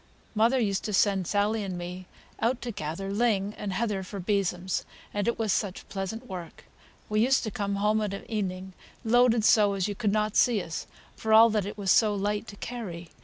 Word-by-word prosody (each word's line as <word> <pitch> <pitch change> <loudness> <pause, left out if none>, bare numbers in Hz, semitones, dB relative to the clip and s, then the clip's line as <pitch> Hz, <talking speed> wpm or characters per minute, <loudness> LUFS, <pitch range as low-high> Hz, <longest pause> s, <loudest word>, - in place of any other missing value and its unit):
Mother 230 +4 +3
used 200 -5 0
to 210 - -3
send 195 -2 +2
Sally 210 +2 +1
and 185 -2 -4
me 180 +1 -7 0.3
out 240 +2 +1
to 240 - -3
gather 195 +2 -4
ling 210 -2 +1
and 205 -2 -5
heather 205 0 -1
for 195 +2 -7
besoms, 185 -1 -1 0.3
and 205 0 -1
it 235 - +1
was 220 -4 +1
such 195 -3 -2
pleasant 200 +5 -4
work! 180 -6 -8 0.4
We 215 0 0
used 255 +4 +3
to 215 - -3
come 200 0 -2
home 210 +2 +2
of 210 -2 -1
an 195 - -6
evening 190 -3 -3 0.3
loaded 235 -1 +4
so 210 -3 +5
as 195 -1 -1
you 205 - -2
could 205 0 0
not 215 0 0
see 235 -4 +4
us, 165 -3 -5 0.3
for 220 0 -1
all 225 +1 +8
that 210 -3 0
it 205 - -7
was 195 -2 +1
so 215 -2 +4
light 205 +2 -1
to 205 - -9
carry. 195 -8 -6
205 Hz, 210 wpm, -27 LUFS, 190-220 Hz, 0.4 s, all